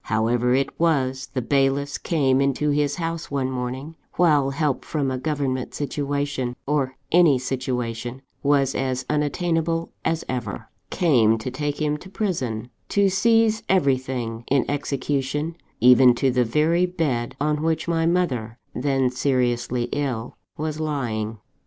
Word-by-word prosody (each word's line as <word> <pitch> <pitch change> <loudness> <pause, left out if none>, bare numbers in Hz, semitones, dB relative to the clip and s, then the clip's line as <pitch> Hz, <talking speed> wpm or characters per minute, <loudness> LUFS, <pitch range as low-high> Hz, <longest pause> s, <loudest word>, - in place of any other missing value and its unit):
However 120 +3 +2
it 135 +1 -1
was, 135 -6 +1
the 130 - -2
bailiffs 140 +2 +1
came 135 -5 +2
into 140 +2 +1
his 145 0 +1
house 165 -1 -4
one 135 -2 -1
morning, 130 +4 -4 0.2
while 150 -6 +4
help 140 -1 -1
from 145 -4 -1
a 130 - -2
government 135 -3 -2
situation, 140 -3 -2
or 135 -3 0 0.2
any 165 -5 +6
situation, 125 -1 -3 0.2
was 140 -2 +2
as 130 -1 -2
unattainable 165 +2 0
as 165 -1 0
ever 120 -5 -4 0.2
came 120 -10 +3
to 120 +3 -5
take 145 +2 -3
him 150 -1 0
to 185 - -12
prison: 130 - -2 0.2
to 200 -1 +3
seize 225 +3 +3
everything, 130 -8 0
in 135 -1 +3
execution, 145 +2 -2 0.2
even 125 +1 +7
to 130 +2 +2
the 125 -1 +2
very 160 +8 +2
bed 145 -10 -2
on 150 +1 0
which 160 0 0
my 165 -1 +1
mother 130 -11 0 0.2
(then 135 -1 +1
seriously 125 -2 0
ill) 130 -5 -2 0.2
was 155 0 -3
lying. 115 -8 -2
140 Hz, 140 wpm, -23 LUFS, 125-155 Hz, 0.2 s, even